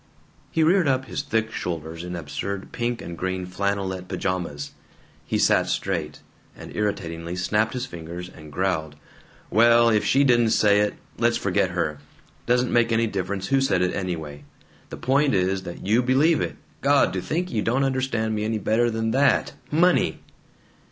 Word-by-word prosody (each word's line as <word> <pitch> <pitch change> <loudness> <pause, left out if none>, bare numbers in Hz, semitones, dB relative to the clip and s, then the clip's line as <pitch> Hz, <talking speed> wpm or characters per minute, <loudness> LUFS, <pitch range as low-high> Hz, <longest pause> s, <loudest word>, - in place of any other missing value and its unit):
He 160 - +1
reared 175 +1 +4
up 130 -1 +1
his - - -3
thick 110 0 -1
shoulders, 80 -2 -5
in 90 0 -5
absurd 85 +5 -5
pink 120 0 -2
and 85 - -6
green 95 +1 -3
flannelette 95 0 -2
pajamas. 85 -8 -3 0.6
He - - 0
sat - - +3
straight, - - -2 0.3
and - - -11
irritatingly 85 -5 -3
snapped 105 +4 0
his 125 0 -3
fingers, 85 -4 -7
and 80 -4 -13
growled: 80 -4 -1 0.6
"Well, 115 +1 +5
if 105 -2 +2
she 140 +2 +3
didn't 120 -4 +4
say 105 -1 +5
it, 105 0 +1 0.2
let's - - +3
forget - - +1
her. 75 -2 -2 0.5
Doesn't 125 +1 +2
make 120 -1 +3
any 115 +1 +3
difference 95 -2 -3
who 135 0 +3
said 100 -9 +2
it, 90 - 0
anyway. 80 -6 -4 0.5
The - - -7
point 135 0 +2
is 95 +1 +1
that 85 - -9
you 110 +5 +3
believe 140 +6 +3
it. - - -3 0.3
God! 140 -9 +3
To 95 - -2
think 175 - -2
you 110 - 0
don't 125 +6 +1
understand 130 -5 0
me 105 -1 -1
any 110 +1 -1
better 115 +3 +1
than 110 0 -1
that! 135 +1 +2 0.2
Money!" 175 +4 +3
105 Hz, 170 wpm, -24 LUFS, 90-120 Hz, 0.6 s, Well